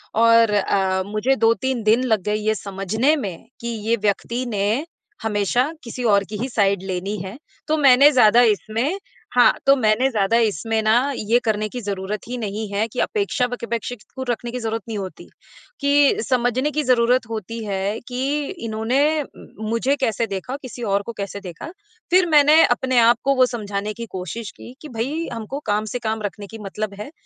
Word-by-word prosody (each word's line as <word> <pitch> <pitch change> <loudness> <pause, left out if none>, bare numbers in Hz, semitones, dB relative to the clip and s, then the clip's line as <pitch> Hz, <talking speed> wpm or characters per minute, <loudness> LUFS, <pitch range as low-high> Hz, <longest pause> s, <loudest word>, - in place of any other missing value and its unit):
और 230 0 +5
अ, 190 -2 +1
मुझे 215 +6 0
2-3 235 +1 +1
दिन 220 +4 +3
लग 220 -5 +1
गए 210 +2 0
ये 215 +1 0
समझने 210 - 0
में 200 - -6
कि 235 - -5
ये 225 0 -1
व्यक्ति 235 +4 -1
ने 215 +6 0 0.4
हमेशा 220 - +1
किसी 245 +1 -6
और 200 -4 +4
की 210 - -5
ही 250 +6 -3
साइड 200 -5 +1
लेनी 190 +2 -3
है। 190 +5 -8 0.3
तो 310 - +1
मैंने 280 0 +7
ज़्यादा 240 -3 +6
इसमें 235 - -2 0.4
हाँ, 245 - +6
तो 275 - +6
मैंने 245 +1 +2
ज़्यादा 215 0 +2
इसमें 225 0 0
ना, 240 +6 +3
ये 225 +1 +2
करने 215 -1 0
की 250 - -6
ज़रूरत 200 0 -4
ही 250 +1 -4
नहीं 215 -1 -4
है 210 +3 0
कि 240 +3 -7
अपेक्षा 400 - 0
वकेपेक्षे 235 0 -4 0.2
को 260 - -4
रखने 240 0 -2
की 250 - -4
ज़रूरत 225 -1 -3
नहीं 225 -2 -4
होती, 190 -2 -7 0.6
कि 285 -2 +4
समझने 250 +3 +1
की 300 0 -1
ज़रूरत 250 -1 +3
होती 225 +1 -5
है 200 +1 -2
कि, 270 +4 -1 0.2
"इन्होंने 260 +8 +1 0.5
मुझे 230 +5 +1
कैसे 230 -2 0
देखा? 200 +6 -4
किसी 250 -2 -8
और 200 -2 +1
को 235 - -4
कैसे 200 0 -5
देखा?" 185 - -8 0.4
फिर 365 0 +5
मैंने 300 +1 +6
अपने 255 +1 0
आप 235 0 +5
को 275 0 +2
वो 255 -1 +5
समझाने 210 -4 -4
की 235 +2 -7
कोशिश 195 +4 -6
की 245 - -11
कि, 305 - -9
"भई, 270 +8 -3
हमको 230 +4 -5
काम 210 +1 +1
से 245 - -2
काम 220 -2 -2
रखने 205 0 -5
की 225 - -9
मतलब 210 +1 -4
है।" 215 +7 -7
230 Hz, 185 wpm, -21 LUFS, 210-255 Hz, 0.6 s, मैंने